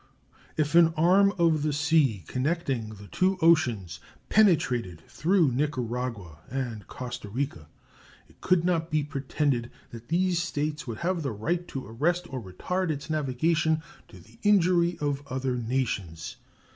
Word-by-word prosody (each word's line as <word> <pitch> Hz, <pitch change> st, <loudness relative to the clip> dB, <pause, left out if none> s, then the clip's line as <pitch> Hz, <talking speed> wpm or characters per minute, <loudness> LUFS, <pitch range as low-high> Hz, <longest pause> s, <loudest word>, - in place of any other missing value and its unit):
If 150 Hz, 0 st, 0 dB
an 165 Hz, -1 st, +6 dB
arm 190 Hz, +5 st, +5 dB
of 165 Hz, -3 st, +3 dB
the 150 Hz, +1 st, 0 dB
sea 145 Hz, -, +2 dB
connecting 130 Hz, -, -2 dB
the 100 Hz, 0 st, -12 dB
two 185 Hz, -, +1 dB
oceans 120 Hz, -, +2 dB, 0.3 s
penetrated 125 Hz, -, +2 dB
through 170 Hz, -4 st, +2 dB
Nicaragua 125 Hz, -, -3 dB
and 120 Hz, -6 st, -4 dB
Costa 120 Hz, -4 st, -7 dB
Rica, 110 Hz, -, -4 dB, 0.6 s
it -, -, -25 dB
could 185 Hz, -2 st, +3 dB
not 170 Hz, -2 st, +1 dB
be 155 Hz, -2 st, +1 dB
pretended 140 Hz, -3 st, -1 dB, 0.2 s
that 115 Hz, 0 st, -10 dB
these 175 Hz, +1 st, +1 dB
States 150 Hz, -3 st, -3 dB
would 115 Hz, -2 st, -4 dB
have 180 Hz, -1 st, 0 dB
the 140 Hz, -4 st, -2 dB
right 170 Hz, -, -2 dB
to 135 Hz, -, -6 dB
arrest 170 Hz, -, 0 dB
or 130 Hz, -, -3 dB
retard 175 Hz, -, -3 dB
its 150 Hz, +1 st, -3 dB
navigation 155 Hz, +2 st, +1 dB, 0.2 s
to -, -, -14 dB
the -, -, -19 dB
injury 180 Hz, -4 st, +3 dB
of 145 Hz, -1 st, -1 dB
other 130 Hz, -1 st, -2 dB
nations. 115 Hz, -9 st, -3 dB
145 Hz, 145 wpm, -27 LUFS, 120-170 Hz, 0.6 s, an